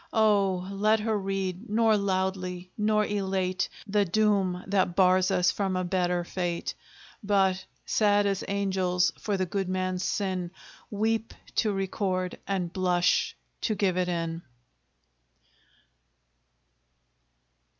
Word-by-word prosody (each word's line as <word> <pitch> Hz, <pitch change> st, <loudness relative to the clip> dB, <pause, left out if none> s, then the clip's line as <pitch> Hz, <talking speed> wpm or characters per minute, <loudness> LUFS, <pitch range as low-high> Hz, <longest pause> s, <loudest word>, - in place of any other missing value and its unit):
Oh! 200 Hz, -4 st, +2 dB
let 210 Hz, +2 st, +2 dB
her 220 Hz, 0 st, 0 dB
read, 195 Hz, +1 st, -3 dB
nor 220 Hz, 0 st, +4 dB
loudly, 185 Hz, -2 st, -2 dB
nor 215 Hz, 0 st, +2 dB
elate, 190 Hz, -2 st, -1 dB, 0.2 s
The 205 Hz, 0 st, +2 dB
doom 195 Hz, -2 st, +1 dB
that 190 Hz, -3 st, +1 dB
bars 185 Hz, 0 st, +4 dB
us 180 Hz, -2 st, +3 dB
from 195 Hz, -2 st, -1 dB
a 185 Hz, -, 0 dB
better 180 Hz, -1 st, 0 dB
fate; 175 Hz, -1 st, -3 dB, 0.5 s
But, 195 Hz, -2 st, +2 dB, 0.2 s
sad 205 Hz, -1 st, +3 dB
as 195 Hz, -1 st, 0 dB
angels 190 Hz, -2 st, +1 dB
for 205 Hz, -2 st, -1 dB
the 185 Hz, -, 0 dB
good 190 Hz, +1 st, -2 dB
man's 185 Hz, 0 st, -1 dB
sin, 185 Hz, -4 st, -1 dB, 0.4 s
Weep 225 Hz, +2 st, -1 dB, 0.2 s
to 215 Hz, -, +3 dB
record, 190 Hz, -1 st, -2 dB
and 185 Hz, -3 st, -2 dB
blush 180 Hz, -1 st, +2 dB, 0.3 s
to 215 Hz, -, 0 dB
give 195 Hz, -3 st, +1 dB
it 180 Hz, -1 st, +1 dB
in! 165 Hz, -1 st, -2 dB
190 Hz, 120 wpm, -28 LUFS, 180-205 Hz, 0.5 s, nor